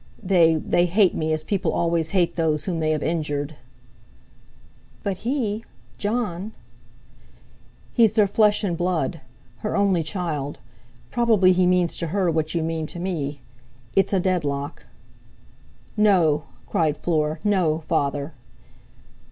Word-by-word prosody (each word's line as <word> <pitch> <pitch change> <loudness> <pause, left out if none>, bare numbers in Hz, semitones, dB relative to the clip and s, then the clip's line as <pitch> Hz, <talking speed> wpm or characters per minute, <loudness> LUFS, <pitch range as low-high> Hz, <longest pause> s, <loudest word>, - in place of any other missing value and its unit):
They—they 175 -2 +3
hate 190 +1 +3
me, 160 0 -1
as 155 0 -1
people 195 +1 -1
always 170 -1 0
hate 180 -3 +1
those 155 -3 0
whom 175 -4 -2
they 155 -1 0
have 155 -2 0
injured." 150 -2 -2 1.5
"But 195 -2 -2
he—Jon—" 215 -3 -3 1.4
"He's 225 -3 +4
their 215 -3 +5
flesh 210 +1 +3
and 180 -4 0
blood, 175 -1 -1 0.4
her 115 - -2
only 195 -4 +3
child. 155 -5 -3 0.5
Probably 220 -6 +4
he 180 0 +3
means 180 -2 +2
to 170 - -3
her 185 +1 +1
what 160 +1 -1
you 165 - +1
mean 160 -1 -2
to 175 - -6
me. 150 -6 -3 0.5
It's 195 - +3
a 195 - +2
deadlock." 150 -6 -2 1.1
"No," 175 -9 +3 0.2
cried 155 -2 0
Fleur, 155 -2 0
"no, 175 -6 +1
Father!" 140 +2 -1
170 Hz, 125 wpm, -23 LUFS, 155-195 Hz, 1.5 s, their